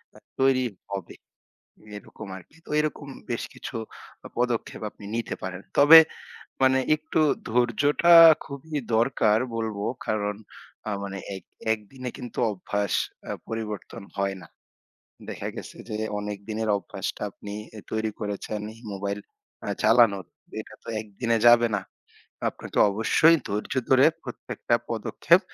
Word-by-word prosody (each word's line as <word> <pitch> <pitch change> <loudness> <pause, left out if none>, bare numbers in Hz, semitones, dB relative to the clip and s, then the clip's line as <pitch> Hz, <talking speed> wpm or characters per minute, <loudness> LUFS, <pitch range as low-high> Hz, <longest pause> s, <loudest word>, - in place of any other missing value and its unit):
আ - - -14 0.2
তৈরি 130 -1 +4 0.3
হবে, 95 -3 -5 0.8
এরকম 110 - -11
আরকি। 95 - -15
তো - - -12
এরকম 150 -1 -3 0.2
বেশ 120 - -1
কিছু 125 - -7 0.6
পদক্ষেপ 120 -2 -1
আপনি 105 - -15
নিতে 115 -2 -2
পারেন। 95 +1 -5 0.2
তবে 160 +3 +11 0.6
মানে 130 0 +5 0.2
একটু 155 +1 -1 0.3
ধৈর্যটা 135 +8 +4 0.3
খুবই 145 +3 -7 0.2
দরকার 115 -3 +3 0.2
বলব 110 -2 -3 0.3
কারণ 105 -1 0 0.5
আ - - -1
মানে 100 0 -5 0.2
এক - - -10 0.3
একদিনে 125 +4 -6
কিন্তু 120 - -8
অভ্যাস 100 0 -2 0.4
আ - - -4 0.2
পরিবর্তন 110 -4 -5
হয় 100 -1 0
না। - - -13 0.8
দেখা - - -5
গেছে - - -8
যে 105 - -3 0.2
অনেক 105 0 -4
দিনের 110 0 -2
অভ্যাসটা 100 - -6
আপনি 100 - -9 0.2
এ - - -6
তৈরি 110 0 -1
করেছেন 105 0 -4
এই 115 - -16
mobile 100 +1 -3 0.5
আ - - -1
চালানোর 110 -3 +5 0.4
এটা - - -14
তো - - -16
১ 110 - -7
দিনে 115 -1 +3
যাবে 120 0 +7
না। - - -4 0.7
আপনাকে - - -6
অবশ্যই 135 +10 +5
ধৈর্য 105 +1 -3 0.2
ধরে 130 +1 +7 0.2
প্রত্যেকটা 120 -1 -3 0.2
পদক্ষেপ 115 - +3
110 Hz, 135 wpm, -26 LUFS, 105-130 Hz, 0.8 s, তবে